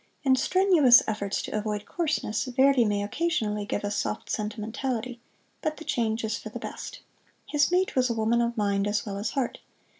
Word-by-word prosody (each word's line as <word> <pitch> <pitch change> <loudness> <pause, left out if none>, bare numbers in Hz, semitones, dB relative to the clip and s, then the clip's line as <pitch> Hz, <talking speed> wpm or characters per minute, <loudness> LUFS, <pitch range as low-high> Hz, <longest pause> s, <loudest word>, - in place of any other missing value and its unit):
In 265 -2 +4
strenuous 330 -5 +5
efforts 205 -2 -2
to - - -5
avoid 210 -1 -2
coarseness 300 - -1
Verdi 260 -1 +4
may 205 -1 0
occasionally 210 -6 -1
give 205 - -2
us 205 0 -2
soft 105 - -3
sentimentality, 225 +3 -3 0.4
but 310 0 -2
the 320 - -10
change 225 -1 -1
is 220 +1 -2
for - - -8
the - - -7
best. - - -7 0.4
His 295 +1 +1
mate 370 +1 +1
was 255 -1 +3
a 235 - -1
woman 225 +2 +2
of 235 0 -1
mind 200 -1 +1
as 205 0 -1
well 200 -2 -4
as 215 +2 -2
heart. 270 -4 -2
230 Hz, 185 wpm, -27 LUFS, 210-270 Hz, 0.4 s, strenuous